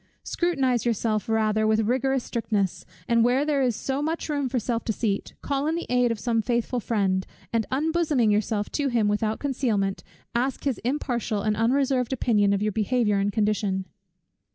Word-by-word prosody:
Scrutinize 270 -9 0
yourself 225 -2 0
rather 220 -1 +2
with 220 0 +3
rigorous 260 +3 +1
strictness; 210 -5 -2 0.2
and 235 -1 +4
where 255 +4 +3
there 295 -2 +1
is 245 -4 +1
so 270 +5 -2
much 320 +2 -2
room 285 -3 -1
for 255 - -1
self 235 0 -1
deceit, 215 -3 -2
call 280 +1 -1
in 320 - +1
the 340 - -3
aid 250 -1 +3
of 230 - -2
some 230 -1 +1
faithful 240 +1 -1
friend, 195 -5 0 0.3
and 225 -2 +1
unbosoming 295 -5 +1
yourself 210 0 0
to 290 -2 0
him 235 -5 +2
without 215 +1 0
concealment, 230 -8 -1 0.3
ask 250 +3 -1
his 275 -5 -1
impartial 240 -4 -2
and 215 -1 +1
unreserved 255 +2 +1
opinion 210 -5 +2
of 200 0 +1
your 215 - +1
behaviour 215 0 +1
and 200 +1 +1
condition. 205 -3 0
235 Hz, 175 wpm, -25 LUFS, 215-265 Hz, 0.3 s, and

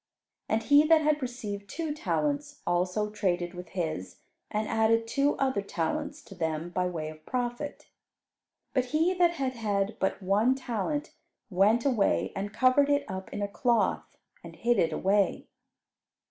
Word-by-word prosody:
And 225 +1 +1
he 285 +1 +6
that 320 0 +5
had 300 0 +2
received 210 -5 -5
two 320 -3 -3
talents, 290 -2 -2
also 180 +4 0
traded 180 -4 -1
with 180 0 -9
his, 95 - -3 0.3
and 215 +1 -1
added 225 +1 +2
two 280 +5 +1
other 265 -6 +1
talents 290 - -3
to - - -12
them 165 -1 -3
by 180 +1 0
way 160 -3 -4
of 155 0 -12
profit. 245 +2 -3 0.9
But 255 -2 +2
he 315 +7 +2
that 350 -2 +3
had 265 -4 -1
had 205 -3 -1
but 190 - 0
one 210 +6 +2
talent 265 - -3 0.4
went 210 +7 +3
away 240 -8 +2
and 200 +1 -3
covered 255 +5 +4
it 285 0 +2
up 190 0 -6
in 205 - -3
a - - 0
cloth 235 +3 0 0.3
and - - -10
hid 240 -2 +1
it 165 -2 +2
away. 195 +4 +1
225 Hz, 160 wpm, -29 LUFS, 190-280 Hz, 0.9 s, he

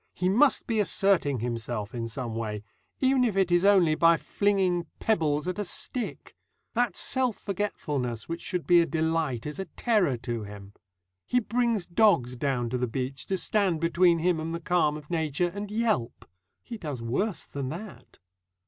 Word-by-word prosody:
He 180 +1 0
must 255 +8 +4
be 225 -2 0
asserting 185 - +2
himself 115 -2 -4
in 115 -2 -3
some 115 0 -5
way, 105 -2 -4 0.4
even 260 -1 +3
if 220 -5 0
it 190 -2 +2
is 175 +1 +4
only 190 -6 +5
by 165 +1 +5
flinging 190 -4 0
pebbles 160 -8 0
at 185 +2 -3
a - - 0
stick. 235 +5 -4 0.4
That 235 -5 0
self 255 -4 +1
forgetfulness 145 - -3
which 165 +1 -4
should 180 -4 -3
be 175 -1 +6
a 165 - 0
delight 160 -7 -1
is 150 +4 -6
a 190 - -3
terror 185 - +1
to 120 -1 -4
him. 100 -1 -10 0.5
He 250 - +3
brings 230 -3 0
dogs 170 - +3
down 125 -2 -1
to 125 - -1
the 125 - 0
beach 130 +3 -4
to 190 - 0
stand 190 -4 +1
between 170 +1 +3
him 170 0 +1
and 165 +1 -3
the - - -4
calm 170 -3 +1
of 150 +2 -12
nature, 160 +1 0
and 205 0 -5
yelp. 215 - -1 0.4
He 230 -2 -8
does 145 - -5
worse 175 - -1
than 140 -2 -5
that. 190 +6 -9
170 Hz, 175 wpm, -27 LUFS, 130-200 Hz, 0.5 s, be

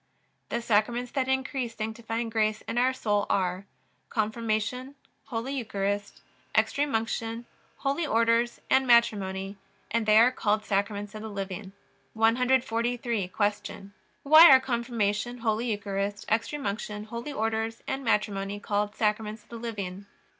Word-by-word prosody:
The 235 - -2
Sacraments 235 +3 +1
that 265 -2 -1
increase 265 -2 -1
sanctifying 225 +1 -4
grace 215 -1 +1
in 240 - -2
our 255 +1 +3
soul 205 -5 0
are: 185 0 0 0.4
Confirmation, 225 +4 -2 0.3
Holy 245 +3 -4
Eucharist, 205 - -3 0.3
Extreme 285 -3 +2
Unction, 225 +1 -2 0.3
Holy 280 +4 -1
Orders, 230 +1 +2
and 265 0 +3
Matrimony; 200 -5 +2 0.3
and 230 -1 0
they 215 0 +6
are 235 +3 +7
called 215 -3 0
Sacraments 205 +1 -1
of 215 - -7
the 220 - -6
living. 195 -1 -6 0.4
143. 235 -1 +1 0.3
Q. 200 -1 -9 0.3
Why 310 +4 +9
are 265 -1 +9
Confirmation, 235 -2 -1
Holy 230 0 -1
Eucharist, 205 -1 -3
Extreme 230 +6 0
Unction, 210 0 -3
Holy 235 +6 -6
Orders, 225 -2 -2
and 270 +1 -3
Matrimony 205 -3 0
called 205 0 -1
Sacraments 215 0 -1
of - - -31
the 235 - -7
living? 200 -4 -5
225 Hz, 130 wpm, -28 LUFS, 205-240 Hz, 0.4 s, Why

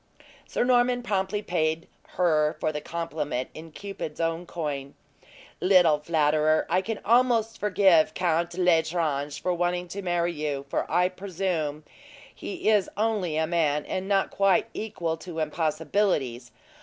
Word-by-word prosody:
Sir - - 0
Norman 245 0 +3
promptly 205 -1 -1
paid 160 -2 -1 0.3
her 155 -4 +2
for 155 - 0
the 150 -1 -4
compliment 155 -6 -3
in 160 +1 -10
Cupid's 195 -4 -7
own 165 +1 -1
coin: 145 -5 -4 0.6
"Little 180 -5 +5
flatterer! 155 0 +2
I 185 +2 +3
can 220 +2 -4
almost 235 -1 +3
forgive 185 -6 +4
Count 170 -1 0
L'Estrange 160 -5 +1
for 180 - 0
wanting 175 +1 -1
to 200 +3 -5
marry 175 -2 0
you; 145 -3 -3
for - - -2
I 180 +2 +3
presume 180 -5 -3 0.5
he 205 - -6
it 210 -3 +4
only 205 -7 0
a 160 - +2
man, 155 -3 0
and 185 +1 -3
not 195 -1 +1
quite 195 -1 +3
equal 175 -7 -3
to 170 0 -9
impossibilities. 155 - -1
170 Hz, 140 wpm, -26 LUFS, 155-190 Hz, 0.6 s, Little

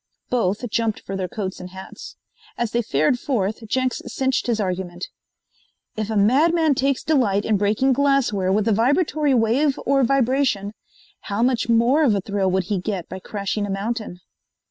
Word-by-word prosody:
Both 230 -1 0
jumped 225 -2 -1
for 195 - -6
their 190 -1 -2
coats 190 0 -5
and 180 - -8
hats. 190 +1 -10 0.4
As 240 -2 -1
they 240 - +1
fared 155 - +1
forth, 220 -5 -2
Jenks 255 +3 -1
cinched 265 -1 -1
his 230 -2 0
argument: 180 -2 -3 0.9
"If 215 -1 -3
a 220 - -1
madman 305 +9 +3
takes 275 0 0
delight 225 -10 +1
in 220 - +2
breaking 210 +7 +2
glassware 260 -9 +1
with 210 +2 +1
a - - +3
vibratory 285 - +2
wave 250 +5 +2
or 275 0 +3
vibration, 255 -5 +1 0.5
how 205 +3 -1
much 245 -2 +1
more 235 +7 +4
of 235 -8 +3
a 200 - -1
thrill 195 0 -1
would 190 0 +1
he 200 +1 -2
get 185 -2 -4
by 185 - -6
crashing 205 +1 -3
a - - -7
mountain?" 200 -2 -4
220 Hz, 170 wpm, -22 LUFS, 195-260 Hz, 0.9 s, more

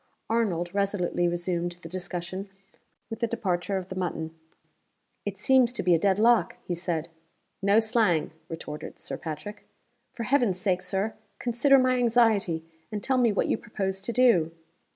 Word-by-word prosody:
Arnold 180 -7 0
resolutely 195 -3 0
resumed 175 0 -1
the - - -6
discussion 185 +2 -5 0.6
with 225 - -5
the 235 - +1
departure 195 -4 -1
of 185 -1 -6
the 185 - -5
mutton. 165 -3 -3 0.9
"It 200 -1 -3
seems 255 +3 +4
to 240 - -2
be 180 0 +4
a 165 - +4
dead 195 +1 +2
lock," 220 -4 +4
he 180 - -3
said. 170 -2 -2 0.5
"No 200 +2 +4
slang!" 220 -8 +2 0.2
retorted 150 -2 -7
Sir - - -5
Patrick. 165 +7 -6 0.5
"For 235 - -5
Heaven's 235 -7 +2
sake, 185 -2 +1
Sir, 195 +3 -1 0.2
consider 260 +3 +4
my 255 -1 +3
anxiety, 220 -9 +3 0.3
and 210 -1 -4
tell 260 -1 +2
me 235 -3 +4
what 205 - +1
you - - +1
propose 195 -3 -3
to 195 - -2
do!" 235 -10 +4
195 Hz, 160 wpm, -27 LUFS, 175-230 Hz, 0.9 s, seems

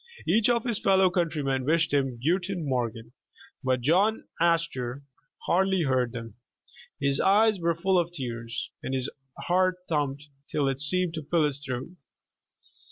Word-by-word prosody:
Each 225 +2 +3
of 235 -2 +2
his 235 -4 0
fellow 190 -2 +4
eountr^^men 155 -7 0
wished 165 +2 +1
him 135 -4 +1
"Guten 180 +3 -1
Morgen," 115 -3 -2 0.5
but 130 -1 +1
John 190 - +2
Astor 150 -6 0 0.4
hardly 190 0 +2
heard 130 -4 +1
them. 115 -2 -7 0.7
His 140 -1 +1
eyes 210 +1 +4
were 170 -1 +1
full 185 +2 +2
of 170 0 -1
tears, 120 -7 -5
and 135 - -3
his 130 +1 -2 0.3
heart 185 +1 +2
thumped 145 -2 -2 0.2
till 145 -2 0
it 135 0 -1
seemed 180 +3 +2
to 160 -3 -5
fill 165 -3 +3
his 145 -1 -3
throat. 130 0 -4
155 Hz, 150 wpm, -27 LUFS, 130-180 Hz, 0.7 s, fellow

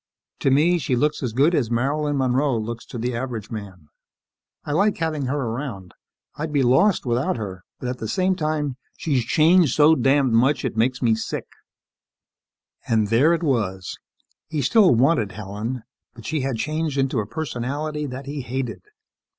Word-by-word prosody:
To - - +2
me, 160 +6 +3
she 130 -3 0
looks 150 +5 0
as 125 -4 -2
good 140 +9 +3
as 130 -9 +1
Marilyn 145 +5 0
Monroe 130 0 +1
looks 115 +1 -5
to - - -7
the 120 +1 -2
average 115 -3 -5
man. 95 -7 -8 0.8
I - - -4
like 200 +7 +2
having 155 -4 -1
her 140 +3 -1
around. 115 -7 -5 0.4
I'd 155 +1 -4
be 145 -2 +2
lost 135 +11 +3
without 120 +1 0
her, 95 -4 -6 0.2
but 125 - -5
at 125 0 -4
the 110 - -4
same 185 - +1
time, 150 -5 -2 0.2
she's 135 -6 0
changed 160 +3 +4
so 155 +1 +6
damned 135 -2 +2
much, 125 +3 +3
she - - -1
makes 125 +4 0
me 115 -2 +4
sick." 110 - -3 1.4
And 110 -3 +2
there 130 +9 +4
it 170 0 0
was. 100 - -1 0.5
He 155 -3 -2
still 190 - +5
wanted 120 - +2
Helen 110 +5 -5 0.3
but 115 -2 -12
she 155 +3 -1
had 130 -3 -2
changed 155 +3 -2
into 135 -3 +1
a 105 - -3
personality 150 +2 -3
that 130 +1 -7
he 140 0 -4
hated. 125 +1 -4
130 Hz, 175 wpm, -23 LUFS, 115-150 Hz, 1.4 s, so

